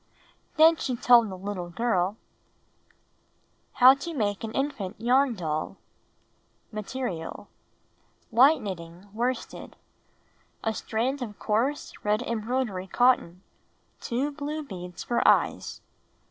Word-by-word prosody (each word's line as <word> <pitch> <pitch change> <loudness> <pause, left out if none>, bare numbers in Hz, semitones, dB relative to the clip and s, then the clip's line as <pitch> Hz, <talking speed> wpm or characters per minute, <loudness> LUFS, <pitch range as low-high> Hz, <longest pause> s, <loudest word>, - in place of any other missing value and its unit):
Then 320 +1 +7
she 255 -4 -2
told 235 -2 +5
the 190 - -7
little 185 -2 -5
girl 195 0 0 0.8
— - - -42
How 255 +1 +10
TO 295 +5 -6
Make 205 -5 -1
an 220 - -4
Infant 245 -10 -3
Yarn 250 +2 +3
Doll 155 -4 -3 0.9
Material: 210 -4 -5 0.8
White 265 +7 +5
knitting 180 0 -7
worsted. 245 +3 -3 0.4
* - - -38
A 220 - 0
strand 250 +6 -2
of 215 -4 -6
coarse 240 +7 -1
red 210 +3 +1
em 235 -3 -2
broidery 220 -5 -2
cotton. 195 -6 +2 0.6
Two 265 +4 -2
blue 300 +1 -4
beads 180 -8 -8
for 240 - 0
eyes. - - +2
230 Hz, 120 wpm, -27 LUFS, 195-260 Hz, 0.9 s, How